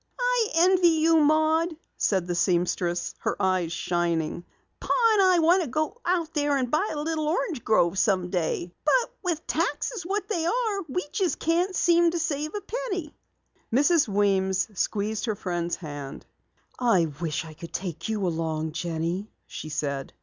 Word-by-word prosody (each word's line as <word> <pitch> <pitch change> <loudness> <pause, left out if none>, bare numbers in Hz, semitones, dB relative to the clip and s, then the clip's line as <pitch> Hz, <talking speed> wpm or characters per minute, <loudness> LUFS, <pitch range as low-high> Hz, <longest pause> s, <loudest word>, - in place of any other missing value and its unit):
"I - - +2
envy 360 +1 +5
you, 325 0 +4
Maud," 315 +2 +3 0.2
said 190 -4 +1
the 175 - -2
seamstress, 175 0 0
her - - -2
eyes 185 -3 +1
shining. 170 -1 -1 0.4
"Pa - - -10 0.2
and 415 - +4
I 370 -2 +5
want 340 +3 +4
to 330 - -2
go 310 - -2
out 340 -2 0
there 290 -2 +1
and 250 -2 -2
buy 370 +8 +1
a 300 - -3
little 315 -1 -1
orange 315 - -1
grove 185 -4 +2
someday. 180 -3 0
But 475 +11 +2
with 335 -4 -2
taxes 370 +6 -1
what 395 +3 -2
they 375 -7 -1
are, 440 -1 0
we 360 +7 -1 0.3
can't 350 +3 0
seem 345 -1 +4
to 340 - -2
save 310 0 -2
a 415 - -3
penny." 395 -8 -4 0.6
Mrs. 290 +4 +4
Weems 195 -1 +1
squeezed 210 +3 -1
her 220 -3 -1
friend's 175 -2 -2
hand. 145 -4 -8 0.5
"I 230 -9 +3 0.2
wish 165 -1 -2
I 160 - -10
could 165 +2 -10
take 170 -1 -4
you 210 -3 -1
along, 160 -2 -2
Jenny," 170 +4 -3 0.2
she 155 - -8
said. 140 -2 -3
260 Hz, 160 wpm, -26 LUFS, -, 0.6 s, envy